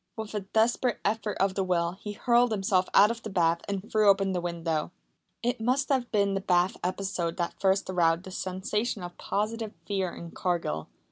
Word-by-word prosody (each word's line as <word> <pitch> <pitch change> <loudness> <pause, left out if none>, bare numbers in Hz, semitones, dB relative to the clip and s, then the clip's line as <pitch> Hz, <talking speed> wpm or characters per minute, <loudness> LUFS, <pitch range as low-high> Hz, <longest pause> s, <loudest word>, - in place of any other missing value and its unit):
With 220 -1 -5
a 210 - 0
desperate 220 +4 +1
effort 210 0 -1
of 195 0 +2
the 195 - 0
will 170 -2 +1
he 205 +3 -7
hurled 240 +2 +3
himself 195 -3 +1
out 210 +3 +7
of 230 0 -6
the 220 - -6
bath 170 -3 +2
and 200 +1 -3
threw 215 -2 +4
open 195 -1 +3
the 180 -2 -1
window. 165 -3 -2 0.5
It 240 -1 -1
must 255 +4 +1
have 260 -4 +1
been 200 -2 +2
the 195 - -1
bath 180 +2 +2
episode 180 -2 -2
that 170 -1 -3
first 195 0 +2
aroused 170 -2 +2
the 190 - -9
sensation 190 +3 -2
of 175 0 -7
positive 220 +1 -2
fear 190 -3 -1
in 170 -1 -9
Cargill. 170 - -2
195 Hz, 195 wpm, -28 LUFS, 180-215 Hz, 0.5 s, out